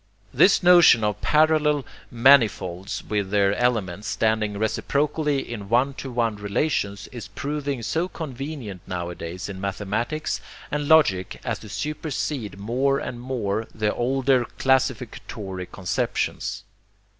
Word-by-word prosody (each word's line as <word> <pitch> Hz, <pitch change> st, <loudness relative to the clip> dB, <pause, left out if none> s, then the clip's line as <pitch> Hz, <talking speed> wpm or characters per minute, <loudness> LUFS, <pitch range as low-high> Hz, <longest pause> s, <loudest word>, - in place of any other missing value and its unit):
This 195 Hz, -1 st, +5 dB
notion 175 Hz, -10 st, +7 dB
of 105 Hz, -1 st, -1 dB
parallel 150 Hz, -2 st, +3 dB, 0.2 s
'manifolds' 110 Hz, -7 st, +3 dB
with 105 Hz, -3 st, -1 dB
their 100 Hz, -1 st, +3 dB
elements 105 Hz, -5 st, 0 dB
standing 110 Hz, -2 st, 0 dB
reciprocally 140 Hz, +6 st, 0 dB
in 105 Hz, -4 st, -7 dB
'one 125 Hz, +4 st, +3 dB
to 135 Hz, -, -6 dB
one 115 Hz, -3 st, 0 dB
relations,' 100 Hz, -1 st, -1 dB
is 115 Hz, -5 st, -7 dB
proving 140 Hz, +4 st, -3 dB
so 165 Hz, +10 st, 0 dB
convenient 135 Hz, -, -6 dB
nowadays 85 Hz, 0 st, -5 dB
in 95 Hz, -2 st, -7 dB
mathematics 105 Hz, +9 st, -2 dB, 0.3 s
and 150 Hz, 0 st, -1 dB
logic 115 Hz, -, +3 dB
as 115 Hz, -4 st, -2 dB
to 110 Hz, -, -11 dB
supersede 140 Hz, -, -3 dB
more 130 Hz, +7 st, +1 dB
and 120 Hz, -3 st, -5 dB
more 115 Hz, -4 st, -2 dB
the 105 Hz, -1 st, 0 dB
older 130 Hz, 0 st, +2 dB
classificatory 115 Hz, -7 st, -1 dB
conceptions. 95 Hz, -2 st, -2 dB
120 Hz, 120 wpm, -24 LUFS, 100-140 Hz, 0.3 s, notion